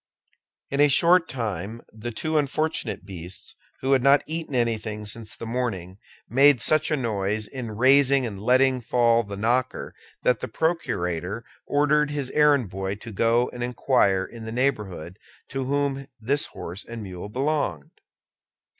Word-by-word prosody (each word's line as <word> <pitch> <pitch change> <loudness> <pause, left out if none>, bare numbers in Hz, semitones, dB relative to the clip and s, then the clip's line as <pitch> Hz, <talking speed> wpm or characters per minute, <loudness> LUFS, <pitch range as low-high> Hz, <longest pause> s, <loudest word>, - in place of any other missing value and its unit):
In 140 - -1
a 145 - +7
short 170 +4 +4
time 110 -2 -4
the 110 +2 -6
two 155 +7 -3
unfortunate 155 +2 -1
beasts, 90 -1 -8 0.3
who 135 - 0
had 135 -2 +4
not 140 +2 +5
eaten 160 -3 -4
anything 110 -3 -1
since 110 +1 -5
the - - -7
morning, 105 -6 -3 0.3
made 135 +1 +5
such 155 +6 +2
a 155 - +1
noise 105 -3 -1
in 120 -2 -6
raising 135 +3 +5
and 100 -4 -6
letting 130 +2 +3
fall 115 0 +3
the 100 -3 -7
knocker 120 +4 0 0.3
that 125 -3 +3
the - - -4
procurator 105 - -2 0.2
ordered 150 +1 +2
his 145 -3 -3
errand 145 -8 +3
boy 95 +1 -3
to 115 +3 -10
go 115 +4 +2
and 125 - -7
inquire 120 -6 +2
in 115 -1 -10
the 110 - -5
neighborhood 105 - -2 0.3
to 135 -1 -3
whom 140 0 -1
this 140 +6 0
horse 90 +5 -8
and 115 -1 -8
mule 95 0 -7
belonged. 130 - -2
120 Hz, 155 wpm, -25 LUFS, 105-140 Hz, 0.3 s, a